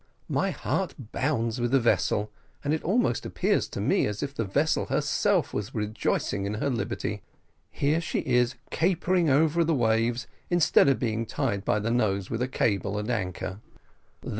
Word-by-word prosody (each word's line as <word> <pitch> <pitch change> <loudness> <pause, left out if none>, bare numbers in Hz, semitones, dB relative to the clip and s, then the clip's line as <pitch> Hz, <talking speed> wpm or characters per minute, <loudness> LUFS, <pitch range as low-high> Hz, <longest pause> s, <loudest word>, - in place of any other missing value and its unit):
My - - +1
heart - - -2 0.2
bounds 120 -4 -1
with 120 - +1
the 135 +2 +4
vessel, 105 -3 +1 0.3
and 145 - 0
it 155 - -1
almost 185 - +1
appears - - 0
to - - -6
me - - +2
as 105 -1 -3
if 140 -1 -4
the 115 - -2
vessel 145 +10 +1
herself - - +1
was 105 +2 -4
rejoicing 105 -2 -1
in 105 - -2
her 135 +6 -1
liberty. 120 - -3 0.5
Here 150 +4 +1
she - - -2
is 125 -2 +2 0.2
capering 175 0 +2
over 160 +4 +3
the 165 -1 +1
waves 115 0 +1 0.2
instead 175 -4 +4
of 135 - +3
being 115 -2 -2
tied 115 -9 -1
by 105 - +1
the 105 +2 -1
nose 100 -5 0
with 115 +1 -2
a 125 - +1
cable 100 -5 0
and 105 +3 -2
anchor." 95 -2 -3
120 Hz, 170 wpm, -27 LUFS, 105-145 Hz, 0.5 s, the